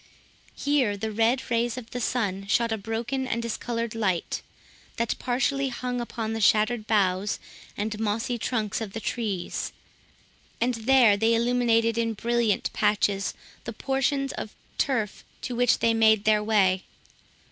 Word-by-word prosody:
Here 270 -8 +1
the 220 +2 -3
red 230 +4 +2
rays 235 +1 +1
of 235 -2 -8
the 245 - -4
sun 200 -5 -1
shot 230 +2 +2
a 220 - 0
broken 230 +5 -3
and 235 - -1
discoloured 235 0 -3
light, 195 -6 -1 0.5
that 235 -1 0
partially 270 +2 0
hung 245 0 -3
upon 225 -2 -4
the 225 - -3
shattered 215 +2 +3
boughs 200 -1 +1 0.4
and 210 +1 -3
mossy 225 +3 -1
trunks 220 -3 -1
of 205 -3 -5
the 225 - -3
trees, 210 -6 -3 0.9
and 245 +2 +1
there 235 -1 +5
they 225 +2 +3
illuminated 230 -1 +2
in 230 -1 0
brilliant 235 -1 0
patches 205 -2 +1 0.3
the 230 - -5
portions 270 +2 0
of 215 - -6 0.2
turf 225 -7 0 0.2
to 250 - -3
which 245 0 +3
they 230 - +2
made 220 -2 +4
their 215 -1 +3
way. 195 -4 +3
225 Hz, 145 wpm, -26 LUFS, 210-245 Hz, 0.9 s, there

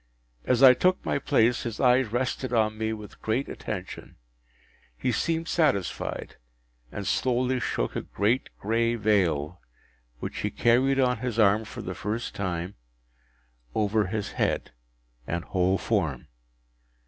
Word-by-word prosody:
As 125 +1 +2
I 130 -1 +10
took 185 +7 +1
my - - 0
place, 125 -4 +2
his 115 -2 -5
eyes 125 -1 +4
rested 130 +1 -1
on 110 -2 +2
me 110 0 -2
with 105 -2 -8
great 115 +5 -1
attention; 95 -3 -7 0.8
he 125 - 0
seemed 165 +5 -1
satisfied, 145 - -1 0.5
and 100 - -5
slowly 125 +2 +1
shook - - -2
a - - -1
great 110 +6 0
gray 115 +2 +1
veil, 90 -7 +1 0.6
which - - -5
he - - -1
carried 130 +3 +3
on 125 -3 +2
his 120 -2 -3
arm 110 0 +4
for - - -8
the - - -4
first 110 +3 -4
time, 90 -1 -3 1.0
over 105 -1 +1
his 105 +1 -3
head - - -1 0.6
and 85 0 -2
whole 95 +1 +1
form. - - -1
110 Hz, 135 wpm, -27 LUFS, 100-125 Hz, 1.0 s, I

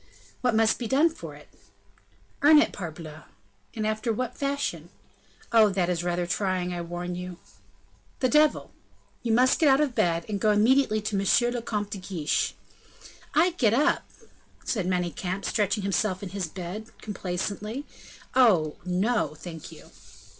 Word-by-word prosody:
"What 245 -3 +1
must 225 0 +3
be 240 - -3
done 295 +7 +3
for - - -9
it?" - - -15 0.9
"Earn 300 +2 +7
it, 300 - +4
parbleu!" 155 -3 -8 0.5
"And 215 -1 -2
after 215 +2 -1
what 240 +2 -3
fashion?" 280 0 -2 0.6
"Oh! 225 -2 +6
that 180 -2 0
is 175 -1 -1
rather 175 0 -1
trying, 185 -1 -1
I 175 - -3
warn 175 +1 -5
you." 180 0 -6 0.8
"The 255 - +2
devil!" 300 +2 +3 0.5
"You 235 - -1
must 250 +3 +4
get 310 - +5
out 270 +1 +5
of 295 -4 +1
bed, 170 -5 +1
and 205 -2 -3
go 215 - +3
immediately 215 +1 +3
to 210 -1 -1
M. 240 +5 +3
le 240 - -2
Comte 210 -3 -3
de - - -4
Guiche." 180 -5 -1 0.8
"I 345 +4 +4
get 235 -10 +2
up!" 300 +6 +1 0.6
said 195 -7 -1
Manicamp, 180 +1 -2
stretching 205 0 0
himself 195 0 0
in 195 - -5
his 190 -2 -3
bed, 185 +5 -7 0.2
complacently, 210 +6 -4 0.5
"oh, 185 -12 +4
no, 185 -2 0
thank 160 0 -9
you!" - - -14
205 Hz, 155 wpm, -26 LUFS, 180-240 Hz, 0.9 s, Earn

